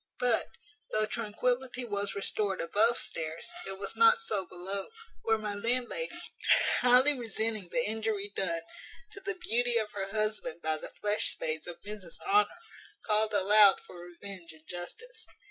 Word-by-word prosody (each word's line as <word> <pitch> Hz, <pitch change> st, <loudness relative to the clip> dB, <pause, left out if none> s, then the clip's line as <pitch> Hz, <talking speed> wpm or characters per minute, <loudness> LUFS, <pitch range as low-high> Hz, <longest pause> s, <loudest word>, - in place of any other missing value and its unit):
But, 245 Hz, -3 st, +2 dB, 0.4 s
though 215 Hz, 0 st, +1 dB
tranquillity 245 Hz, +3 st, -1 dB
was 200 Hz, -2 st, -2 dB
restored 200 Hz, 0 st, -1 dB
above 220 Hz, +7 st, +3 dB
stairs, 160 Hz, -, -4 dB, 0.2 s
it 195 Hz, 0 st, -5 dB
was 195 Hz, 0 st, -5 dB
not 460 Hz, +1 st, +6 dB
so 200 Hz, -, -2 dB
below; 190 Hz, +2 st, -3 dB, 0.3 s
where 225 Hz, -1 st, +2 dB
my 210 Hz, -1 st, -4 dB
landlady, 245 Hz, -, -1 dB, 0.6 s
highly 250 Hz, +4 st, +6 dB
resenting 220 Hz, -5 st, -1 dB
the 245 Hz, +5 st, 0 dB
injury 215 Hz, -1 st, -1 dB
done 170 Hz, -3 st, -1 dB, 0.5 s
to -, -, -9 dB
the 395 Hz, 0 st, -3 dB
beauty 245 Hz, -7 st, +1 dB
of 215 Hz, -2 st, -1 dB
her 195 Hz, -1 st, -3 dB
husband 215 Hz, -5 st, -1 dB
by 155 Hz, 0 st, +1 dB
the -, -, -6 dB
flesh 210 Hz, 0 st, 0 dB
spades 155 Hz, +1 st, -2 dB
of 170 Hz, -1 st, -8 dB
Mrs 205 Hz, -4 st, -8 dB
Honour, 410 Hz, +1 st, +4 dB, 0.6 s
called 215 Hz, 0 st, +2 dB
aloud 205 Hz, 0 st, +7 dB
for 180 Hz, -, -13 dB
revenge 175 Hz, -1 st, -8 dB
and 160 Hz, 0 st, -17 dB
justice. 440 Hz, -, -7 dB
210 Hz, 150 wpm, -30 LUFS, 190-240 Hz, 0.6 s, aloud